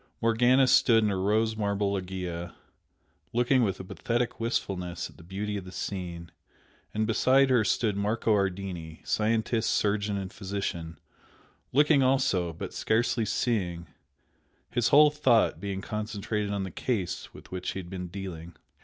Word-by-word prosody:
Morgana 120 +4 +4
stood 115 -2 +5
in 105 - +2
her 95 -1 -1
rose 110 +3 +2
marble 100 -1 0
loggia, 90 -3 -4 0.8
looking 125 +2 +3
with 100 -5 0
a - - -5
pathetic 115 +6 -2
wistfulness 90 -7 -2
at - - -21
the - - -14
beauty 100 +4 -4
of 100 - -5
the 90 - -10
scene, 90 -3 -5 0.6
and 110 +1 0
beside 130 +4 +4
her 120 -3 +4
stood 105 -1 +1
Marco 105 +2 +1
Ardini, 95 -5 -2
scientist, 110 +1 +1
surgeon 105 0 +1
and 95 -1 -5
physician, 95 -4 -4 0.7
looking 145 +1 +4
also, 130 -10 +2
but 80 - -7
scarcely 115 0 +1
seeing, 95 -6 -1 0.9
his 120 -1 +2
whole 150 +3 +7
thought 120 - +3
being 95 0 -4
concentrated 105 0 -3
on 100 -1 -1
the 95 - -5
"case" 100 -2 -3
with - - -14
which 90 -1 -3
he - - -4
had 90 -2 -8
been 90 -1 -5
dealing. 85 -3 -7
100 Hz, 150 wpm, -28 LUFS, 95-115 Hz, 0.9 s, whole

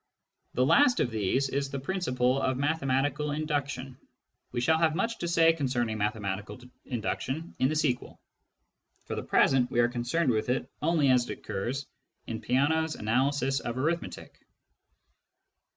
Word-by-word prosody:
The 125 - +3
last 250 - +5
of 120 - +1
these 110 +6 0
is 140 +1 -1
the 140 0 -4
principle 130 -6 0
of 130 -1 0
mathematical 145 0 0
induction. 140 -4 -3 0.5
We 120 - -2
shall 160 +6 +3
have 160 -1 +2
much 230 +5 -1
to 170 - -2
say 165 -1 +5
concerning 120 -7 -1
mathematical 105 0 -3 0.3
induction 130 +6 -3
in 130 - +3
the 155 - -1
sequel; 135 -5 -1 0.9
for - - -5
the - - -3
present, 125 -2 +3
we 125 -2 0
are 120 0 +4
concerned 125 +5 0
with 110 +1 -1
it 125 - 0
only 155 -3 +3
as 125 -1 +2
it - - -4
occurs 130 +8 -4 0.4
in 110 -1 -5
Peano's 150 +7 +1
analysis 135 +4 +1
of 120 +1 -4
arithmetic. 160 +6 -3
135 Hz, 150 wpm, -29 LUFS, 120-155 Hz, 0.9 s, last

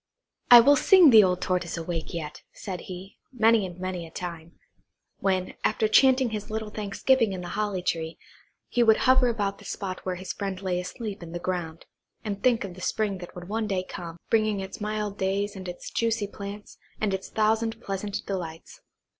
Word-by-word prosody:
"I 240 -1 +11
will 285 +4 +6
sing 360 -1 +7
the 220 -2 +9
old 180 -1 +1
Tortoise 180 -2 -1
awake 165 0 -4
yet," 155 -3 -6
said 185 -4 -6
he, 185 +2 -9
many 225 -4 +3
and 175 -1 -10
many 185 -2 -4
a - - -13
time, 170 -1 -7 0.7
when, 185 -2 0
after 220 - +2
chanting 260 +2 +5
his 210 0 -5
little 220 -1 -4
thanksgiving 215 +2 +1
in 185 - -5
the 175 - -6
holly 205 -3 -2
tree, 165 -2 -2 0.5
he 245 - +1
would 225 -2 +6
hover 255 -1 +5
about 205 -4 -1
the - - -14
spot 185 -2 -5
where 185 -1 -2
his 185 +1 -5
friend 195 -2 -4
lay 180 -2 0
asleep 205 +2 -6
in 170 -1 -9
the 175 - -3
ground, 170 -3 -4 0.4
and 205 -2 -4
think 240 -4 +3
of 195 -3 -6
the 185 - -12
spring 200 0 -1
that 175 - -10
would 175 0 -8
one 220 +2 -2
day 190 -3 -1
come, 170 -2 -8
bringing 215 -2 +2
its 190 +2 -7
mild 210 -1 -3
days 200 +2 -1
and 190 -1 -7
its 175 - -8
juicy 225 -2 0
plants, 200 +1 -9 0.2
and 210 -2 0
its 190 0 -4
thousand 225 +1 +1
pleasant 195 -1 -4
delights. 180 - -6
195 Hz, 195 wpm, -26 LUFS, 180-220 Hz, 0.7 s, I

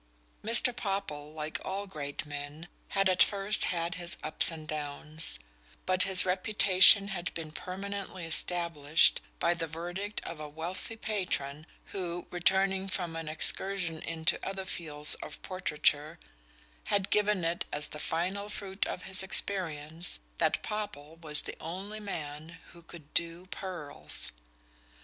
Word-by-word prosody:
Mr. 235 +3 +6
Popple, 195 -10 -3
like 155 0 -4
all 195 +2 -3
great 150 -8 -5
men, 145 +3 -7 0.2
had 195 -1 +2
at 185 0 +2
first 200 +1 +4
had 170 -1 -1
his 170 0 -2
ups 155 - +6
and 160 -2 -7
downs; 150 - -1 0.5
but 185 0 +4
his 190 -1 +5
reputation 195 +1 +6
had 175 -3 -3
been 160 -2 -6
permanently 190 +1 -6
established 165 -2 +3 0.2
by 170 - +2
the 165 -1 -4
verdict 175 +6 -4
of 170 - -7
a 150 -1 -6
wealthy 175 +8 -6
patron 175 -9 -3 0.2
who, 175 -3 -4
returning 190 +2 +2
from 175 -3 -1
an 165 -1 -5
excursion 170 +1 +1
into 165 0 0
other 195 0 -4
fields 150 -5 0
of - - -7
portraiture, 155 -3 0 0.7
had 200 -2 +1
given 210 -3 +2
it 170 +1 0
as 145 0 -1
the 150 - -7
final 185 +7 -2
fruit 200 -1 -3
of - - -5
his 190 0 0
experience 170 -4 +1 0.2
that - - +1
Popple 165 -8 -5
was 155 -3 +1
the - - -6
only 195 +6 -6
man 160 -4 -6
who 170 - -15
could 165 -3 -12
"do 170 +2 0
pearls." 175 -7 -1
175 Hz, 140 wpm, -30 LUFS, 155-195 Hz, 0.7 s, Mr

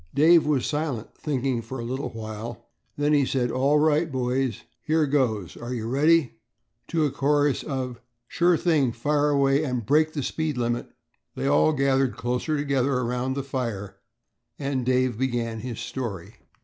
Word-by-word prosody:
Dave 160 +2 +6
was 145 -4 +1
silent, 145 -7 -3
thinking 135 -4 -1
for 115 +4 -7
a 120 - -5
little 130 +4 -3
while. 110 +1 -7 0.3
Then 145 +1 +2
he 145 -1 +4
said, 125 -2 0
"All 140 +3 +2
right 155 +1 +2
boys, 130 -2 -1 0.2
here 155 0 +2
goes. 120 - 0
Are 120 +2 -5
you 110 -2 -4
ready?" 140 -1 +2 0.5
To 160 -2 +1
a 145 - 0
chorus 145 +1 +1
of 130 -4 -4 0.3
"Sure 175 0 +3
thing, 150 -9 +2
fire 145 +5 +1
away, 140 0 +3
and 125 -6 -2
break 155 +5 +3
the 145 - -2
speed 155 -2 -2
limit," 120 0 -1 0.5
they - - -3
all 75 +2 +4
gathered 135 -4 +1
closer 125 +6 -1
together 140 -2 +1
around 125 +1 -1
the 140 - -2
fire 120 -7 -4 0.6
and 135 -2 -2
Dave 130 -3 +1
began 120 -3 -1
his 120 0 -6
story. 105 -7 -5
130 Hz, 160 wpm, -25 LUFS, 120-145 Hz, 0.6 s, Dave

